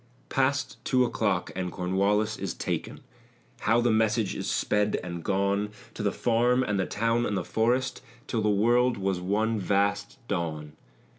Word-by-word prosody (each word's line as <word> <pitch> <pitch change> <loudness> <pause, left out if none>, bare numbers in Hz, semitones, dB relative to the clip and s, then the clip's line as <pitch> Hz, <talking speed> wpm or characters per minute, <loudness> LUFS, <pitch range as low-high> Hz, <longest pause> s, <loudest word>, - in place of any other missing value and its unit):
"Past 130 0 0
two 130 -1 +3
o'clock 100 -6 -1
and 90 -1 -3
Cornwallis 100 +4 +1
is - - -4
taken." - - -4 0.6
How 115 +2 +3
the 120 -1 +2
message 110 -1 +2
is - - -3
sped 105 0 +1
and 85 -2 -6
gone 100 +2 0 0.2
To - - -6
the 100 - +1
farm 120 +3 +2
and 105 -5 -1
the 95 - 0
town 115 +2 +1
and 105 -4 -1
the - - -1
forest 125 +4 0 0.2
Till 115 - -1
the 105 - +2
world 120 +4 +3
was 95 -2 -1
one 110 +4 0
vast 100 +1 0
dawn! 80 -6 -3
105 Hz, 160 wpm, -27 LUFS, 100-120 Hz, 0.6 s, two